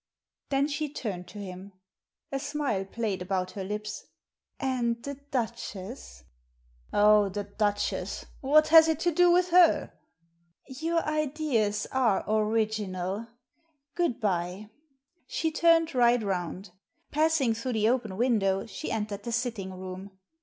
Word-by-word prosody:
Then 275 +1 +2
she 295 0 -3
turned 190 -10 -5
to - - -11
him. 190 0 -8 0.6
A 275 - -1
smile 270 -10 -2
played 205 -2 -3
about 185 0 -2
her 195 - -5
lips. 210 +2 -5 0.6
"And 245 -3 0
the 280 - -4 0.2
Duchess? 185 - -5 0.2
" - - -41
" - - -32
Oh, 210 -1 +5
the 205 +2 -4
Duchess! 205 0 -2
what 305 +3 +4
has 320 0 +9
it 320 -2 0
to 345 - +2
do 355 +2 +4
with 360 +1 +4
her? 350 -1 +5 0.4
" 170 0 -41
"Your 330 +1 +1
ideas 290 -9 0
are 245 -7 +2
original. 215 -2 -1 0.7
Good 340 -9 0
bye." 190 0 -2 0.6
She 320 - -1
turned 330 0 +3
right 240 -2 +4
round. 185 0 -3 0.4
Passing 305 -5 +2
through 230 +3 -3
the 220 -1 +2
open 230 -6 -1
window, 205 -5 +1
she 270 +7 -6
entered 210 -2 -3
the 235 - -5
sitting 230 -5 -2
room. 185 +1 -8
220 Hz, 140 wpm, -28 LUFS, 195-275 Hz, 0.7 s, has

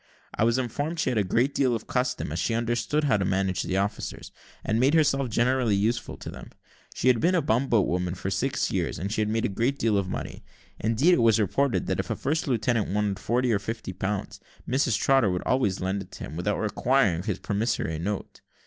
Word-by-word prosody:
I 110 - +1
was 115 +2 +2
informed 145 +6 -2
she - - +1
had 115 - +1
a - - +2
great 120 +9 +1
deal 130 -4 +2
of 110 - -5
custom, 125 - -1
as 80 - -3
she 115 - 0
understood 120 +6 0
how 135 -8 +3
to 100 - -1
manage 95 0 0
the 95 - -2
officers, 100 +1 -3 0.3
and 110 +1 0
made 135 +5 +4
herself 140 -4 +2
generally 120 -1 +2
useful 110 +4 -1
to - - -8
them. - - -10 0.5
She - - -1
had 125 -3 +5
been 180 +7 +2
a 175 - +3
bumboat 115 -3 +2
woman 90 0 -1
for 95 +1 -4
six 125 +9 0
years, 90 -4 -1
and 95 +6 -4
had 110 -1 0
made 110 +1 0
a - - +3
great 115 +8 -1
deal 110 -5 +2
of 95 -1 -3
money. - - -6 0.4
Indeed, 115 - +3
it 150 - +3
was 115 -1 +4
reported, 125 +6 +1
that - - -1
if - - -3
a - - 0
first 155 +3 -1
lieutenant 115 -3 +1
wanted 105 -1 0
forty 120 +1 +1
or 100 - +2
fifty 110 -2 -5
pounds, 95 +2 -3 0.3
Mrs 125 -3 +1
Trotter 135 -6 +3
would 90 -1 -2
always 115 -7 +1
lend 95 +2 -1
it 95 - -11
to - - -8
him, 75 - -7
without 95 +5 -1
requiring 110 -4 +1
his 95 0 -2
promissory 100 - -1
note. 100 +4 -4
110 Hz, 220 wpm, -26 LUFS, 100-130 Hz, 0.5 s, had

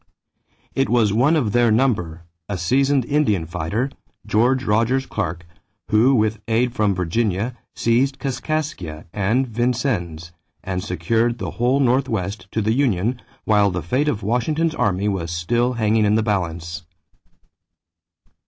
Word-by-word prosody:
It 135 - 0
was 115 -4 +3
one 135 +9 +3
of 125 -10 +1
their 120 +1 +3
number, 100 -9 0 0.3
a 100 - -2
seasoned 135 +8 +2
Indian 120 - +1
fighter, 90 - -2 0.3
George 120 +5 +2
Rogers 115 +4 +1
Clark, 85 -8 -4 0.5
who 120 +6 +5
with 110 -1 +1
aid 120 +2 +1
from 105 -4 +1
Virginia 100 +5 -1 0.2
seized 130 +4 +1
Kaskaskia 130 - -3
and 110 +6 +1
Vincennes 110 - -2 0.3
and 90 -1 -3
secured 110 +6 0
the - - -4
whole 125 +3 +1
Northwest 115 -7 0
to 110 - -1
the 110 +2 +1
union 120 -2 0 0.2
while 105 -2 +4
the 90 -3 -3
fate 130 - 0
of 110 -9 -1
Washington's 150 +9 0
army 100 - 0
was 95 -5 -2
still 120 +9 0
hanging 110 -2 +2
in 105 +1 +3
the 110 - +2
balance. 85 -4 -2
110 Hz, 135 wpm, -21 LUFS, 95-125 Hz, 0.5 s, who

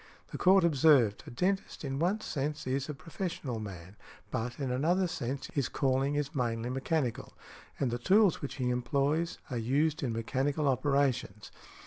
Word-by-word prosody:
The - - -6
Court 190 0 +6
observed, 140 -9 +4
"A - - -6
dentist, 185 +5 -1
in 135 0 -3
one 190 +6 +1
sense, 150 -5 -3
is 130 +1 -1
|170| - - -13
a - - -2
professional 165 - -4
man, 95 -2 -8 0.3
but, 120 +4 -3
in 135 -3 -2
another 170 +9 +2
sense, 135 -4 -4
his 140 -4 0
calling 135 +1 +1
is 145 -1 -2
mainly 120 -2 -1
mechanical, 135 -2 -2 0.5
and 130 -4 0
the 120 - -2
tools 195 - +4
which 140 - -5
he 125 -2 0
employs 140 +6 0
are 125 - -1
used 145 +7 +1
in 130 -5 -1
mechanical 135 +6 -1
operations. 130 -6 0
135 Hz, 165 wpm, -31 LUFS, 125-155 Hz, 0.5 s, Court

